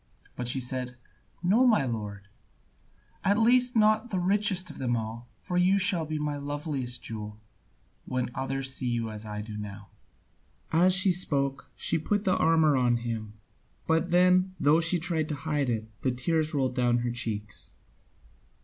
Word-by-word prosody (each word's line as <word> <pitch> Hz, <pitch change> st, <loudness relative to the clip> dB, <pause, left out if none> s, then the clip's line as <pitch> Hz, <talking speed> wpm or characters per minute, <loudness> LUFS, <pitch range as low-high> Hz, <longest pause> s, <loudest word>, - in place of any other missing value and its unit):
But 125 Hz, -, -4 dB
she 130 Hz, +2 st, 0 dB
said, 125 Hz, 0 st, -4 dB, 0.5 s
"No, 220 Hz, +9 st, +4 dB
my 215 Hz, -, +3 dB
lord, 105 Hz, -4 st, -5 dB, 1.0 s
at 200 Hz, +2 st, +3 dB
least 245 Hz, +2 st, +4 dB
not 215 Hz, +2 st, +3 dB
the 195 Hz, -, -2 dB
richest 190 Hz, 0 st, +1 dB
of -, -, -12 dB
them 120 Hz, -2 st, 0 dB
all, 115 Hz, +2 st, -6 dB
for 180 Hz, -, -4 dB
you 185 Hz, +2 st, +4 dB
shall 180 Hz, -4 st, +1 dB
be 155 Hz, 0 st, -3 dB
my 150 Hz, -1 st, -2 dB
loveliest 140 Hz, -3 st, -4 dB
jewel, 105 Hz, -2 st, -6 dB, 0.7 s
when 125 Hz, -1 st, -2 dB
others 135 Hz, 0 st, -3 dB
see 130 Hz, -1 st, -3 dB
you 115 Hz, -2 st, -1 dB
as 110 Hz, 0 st, -8 dB
I 105 Hz, 0 st, -5 dB
see 110 Hz, -, -10 dB
you 105 Hz, -, -6 dB
now." 105 Hz, 0 st, -8 dB, 0.8 s
As 180 Hz, +3 st, +5 dB
she 190 Hz, 0 st, +4 dB
spoke, 140 Hz, -7 st, -1 dB
she 165 Hz, -, 0 dB
put 205 Hz, +6 st, -1 dB
the 185 Hz, -2 st, +2 dB
armour 160 Hz, -2 st, +3 dB
on 125 Hz, -2 st, +2 dB
him, 110 Hz, -3 st, -4 dB, 0.5 s
but 160 Hz, +2 st, +1 dB
then, 180 Hz, +1 st, +3 dB
though 155 Hz, +3 st, +4 dB
she 165 Hz, +2 st, +3 dB
tried 160 Hz, -2 st, 0 dB
to 150 Hz, -, -2 dB
hide 145 Hz, -4 st, 0 dB
it, 110 Hz, -2 st, -2 dB
the 130 Hz, -, +1 dB
tears 155 Hz, +5 st, +1 dB
rolled 135 Hz, -4 st, 0 dB
down 120 Hz, -1 st, +2 dB
her 120 Hz, -, -1 dB
cheeks. 105 Hz, -3 st, -4 dB
145 Hz, 170 wpm, -28 LUFS, 120-180 Hz, 1.0 s, As